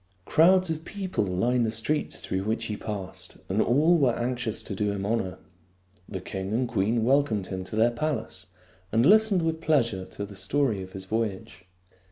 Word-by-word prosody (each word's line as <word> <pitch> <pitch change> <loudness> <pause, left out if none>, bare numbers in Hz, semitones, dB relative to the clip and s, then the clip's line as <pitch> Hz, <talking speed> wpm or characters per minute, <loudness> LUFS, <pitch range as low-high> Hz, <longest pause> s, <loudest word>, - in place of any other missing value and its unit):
Crowds 185 +2 +4
of 160 0 -4
people 190 - -2
lined 115 +7 +1
the 110 - +1
streets 115 +8 -1
through 95 0 -2
which 110 +2 -1
he 105 - -3
passed, 100 -3 -5
and 100 +4 +1
all 155 +8 +4
were 130 -5 +2
anxious 120 -2 -2
to 105 - -5
do 105 +1 0
him 100 -1 -3
honor. 100 -4 -1 0.7
The 95 - -4
king 95 +2 -5
and 125 +2 +1
queen 115 +1 +1
welcomed 130 -7 +2
him 95 -1 -4
to 105 - -7
their 115 +2 +4
palace 120 -8 -3 0.4
and 115 +3 +3
listened 210 -2 +5
with 160 0 -1
pleasure 115 - +1
to 100 - -6
the 100 0 -11
story 105 +3 0
of 95 0 -9
his 95 -1 -7
voyage. 100 -3 -3
115 Hz, 185 wpm, -27 LUFS, 95-145 Hz, 0.7 s, listened